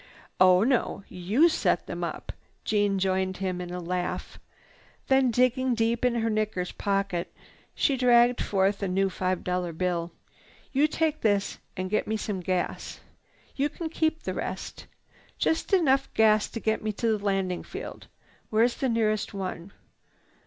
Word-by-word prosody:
"Oh 185 +1 +6
no; 240 -5 0
you 205 - +3
set 330 - +1
them - - -5
up." - - -4 0.3
Jeanne 205 -2 +2
joined 190 0 0
him 185 -2 -2
in 175 - -6
the 180 0 -4
laugh. 180 +1 -3 0.7
Then, 265 -1 +4
digging 255 +1 +2
deep 230 +1 0
in 250 -1 +2
her 225 -1 0
knickers 215 -4 -1
pocket, 195 -3 -1 0.4
she 275 - +2
dragged 245 -1 +4
forth 195 +1 +1
a 200 - 0
new 190 +1 +1
five 185 -1 -1
dollar 180 -1 -1
bill. 175 0 -1 0.6
"You 285 +3 +3
take 310 0 -1
this 205 -2 +1 0.2
and 185 0 -2
get 215 +3 0
me 220 - 0
some 205 -2 -3
gas. 180 0 -3 0.6
You 285 +2 +1
can 320 +2 -5
keep 320 0 0
the - - -3
rest. - - -5 0.5
Just 320 - 0
enough 295 -9 +3
gas 215 -1 +4
to 230 - -5
take 220 0 0
me 215 - -1
to 225 +1 +1
the 205 - -7
landing 195 -3 0
field. - - -8 0.4
Where 220 +1 +3
is 240 0 +1
the 265 - 0
nearest 215 -3 0
one?" 185 -1 -5
210 Hz, 160 wpm, -27 LUFS, 185-245 Hz, 0.7 s, Oh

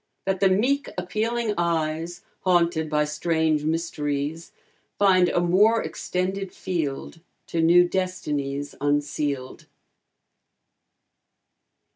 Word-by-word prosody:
That 190 -1 0
the 195 - +4
meek 255 +9 +1
appealing 215 +5 -1
eyes 165 0 -1 0.2
Haunted 170 -3 +2
by 150 0 +2
strange 155 0 0
mysteries, 155 -1 -2 0.5
Find 185 -3 +4
a - - +1
more 200 +6 +4
extended 185 +4 -3
field, 165 -3 -4 0.3
To 165 - 0
new 175 +2 +6
destinies 145 -7 -3
unsealed? 145 -2 -2
170 Hz, 90 wpm, -24 LUFS, 150-185 Hz, 0.5 s, new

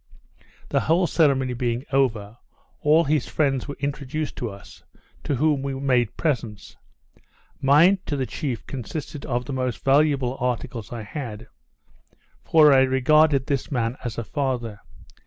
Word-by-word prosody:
The - - +2
whole 170 +3 +2
ceremony 135 -7 +2
being 120 +1 -2
over, 115 -6 0 0.4
all 155 +3 +4
his 150 -2 0
friends 135 -4 0
were 140 - -7
introduced 145 +2 -3
to 120 - -3
us, 100 -2 -13 0.4
to 145 - -1
whom 145 +1 +1
we 135 0 -3
made 125 -4 0
presents. 115 - -3 0.9
Mine 155 +8 +5
to 145 - -1
the 130 - -1
chief 130 -2 -4
consisted 140 +3 -6
of 120 0 -1
the 135 - -5
most 130 -2 -3
valuable 135 -2 +2
articles 120 -2 -3
I 115 -2 -5
had; 120 -3 -7 1.0
for 155 -3 +6
I 135 - +6
regarded 135 +2 +3
this 140 -2 -2
man 120 -3 -1
as 120 -3 -5
a 115 - -2
father. 120 -5 -3
135 Hz, 145 wpm, -24 LUFS, 120-145 Hz, 1.0 s, for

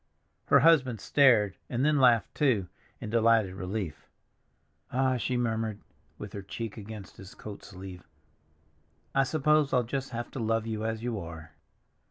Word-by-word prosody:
Her - - +6
husband 135 -9 +4
stared, 110 -7 +4
and 125 +2 0
then 150 -1 +3
laughed, 120 -4 +4
too, 125 - +2 0.3
in 105 - -6
delighted 115 -4 +3
relief. 95 -4 -5 0.8
"Ah," 130 0 +1
she 125 +1 -1
murmured, 110 -3 -1 0.4
with 105 - -8
her 100 - -5
cheek 105 +2 -6
against 105 -2 -9
his 95 0 -12
coat 105 -2 -9
sleeve, 95 -2 -10 1.1
"I 135 - +4
suppose 150 +1 +2
I'll 125 -1 +4
just 135 +3 -4
have 120 -1 -5
to - - -6
love 115 0 0
you 110 -1 -3
as 110 0 -3
you 120 -3 -2
are!" 80 -2 -9
115 Hz, 155 wpm, -29 LUFS, 100-130 Hz, 1.1 s, Her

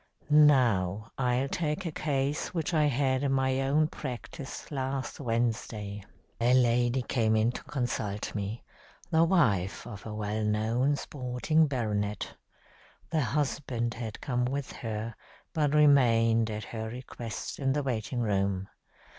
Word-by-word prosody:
"Now, 115 -9 +4
I'll 125 +1 +1
take 155 +4 -2
a 165 - -2
case 145 +2 -1
which 165 0 -1
I 155 -2 +4
had 135 -1 +1
in 140 -1 +1
my 130 0 +2
own 145 +3 +3
practice 135 0 -7
last 135 -1 -3
Wednesday. 115 -4 -2 0.4
A 120 +2 +4
lady 120 0 +3
came 110 -3 +1
in 110 +2 +3
to - - -8
consult 120 -7 -2
me 105 +2 -4 0.5
the 160 0 +5
wife 115 - +2
of 105 -5 -8
a 105 - -5
well 105 +1 -2
known 110 +6 +1
sporting 140 +4 0
baronet. 105 -6 -2 0.8
The 160 -2 +2
husband 130 -2 -1
had 110 -1 -6
come 125 -2 0
with 135 +1 -3
her, 110 0 -4 0.4
but 150 -3 +1
remained, 115 -6 +5
at 105 0 -4
her 110 -1 -5
request, 120 -1 -6
in 135 -1 +1
the 145 0 0
waiting 120 -1 -2
room. 100 -3 0
125 Hz, 140 wpm, -29 LUFS, 110-140 Hz, 0.8 s, the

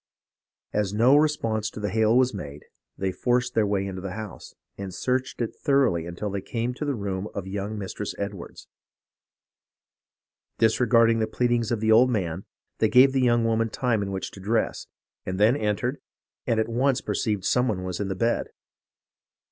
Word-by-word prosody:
As 105 -1 0
no 120 +6 +5
response 115 -8 +1
to - - -9
the 105 -2 -2
hail 110 +2 +3
was 130 -1 +3
made, 75 -7 -8 0.3
they 95 -1 -1
forced 125 +4 0
their 110 -2 +2
way 100 -1 0
into 95 -1 -5
the 95 -1 -5
house, 110 -2 -8 0.2
and 100 -1 -6
searched 125 +7 -2
it 115 - -3
thoroughly 130 - +1
until 85 +4 -4
they 100 0 -3
came 115 +4 -3
to 150 - -5
the 140 -2 -1
room 100 -2 -3
of 100 - -4
young 100 +2 -4
Mistress 100 +1 -5
Edwards. 100 -3 -7 1.9
Disregarding 115 0 +4
the 110 - +1
pleadings 120 0 0
of 115 -3 -1
the 110 0 +2
old 120 +4 +6
man, 95 -6 -2 0.3
they 110 - +3
gave 130 +3 +6
the 135 - +2
young 120 -2 +3
woman 115 0 +1
time 115 -1 0
in 100 - -3
which 95 -1 -4
to - - -12
dress, 110 +4 -1 0.4
and 95 +1 -4
then 110 +5 +5
entered, 105 -7 -1 0.5
and 115 - +2
at 110 - +1
once 130 +3 +1
perceived 105 -4 -2
some 125 0 +2
one 95 -5 -2
in 100 - -2
the 95 - -3
bed. 115 +5 0
110 Hz, 180 wpm, -25 LUFS, 100-120 Hz, 1.9 s, old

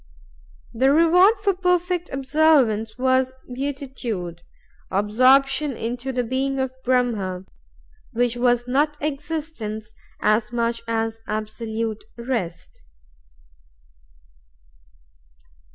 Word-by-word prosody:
The 260 +4 +3
reward 350 +7 +6
for 400 -2 +3
perfect 360 -1 0
observance 265 -6 +2
was 260 0 +2 0.2
Beatitude, 250 -10 -4 0.5
or 190 - -1
absorption 265 +7 +4
into 245 +3 -3
the 250 -1 -1
being 265 +3 -1
of 265 -1 -1
Brahm, 220 -8 0 0.7
which 245 0 0
was 245 0 +2
not 295 +4 +1
existence 290 -7 -4 0.3
as 215 +2 +2
much 235 -1 -1
as 225 0 -2
absolute 220 +1 -3
rest." 230 -9 -4
250 Hz, 90 wpm, -23 LUFS, 225-275 Hz, 0.7 s, reward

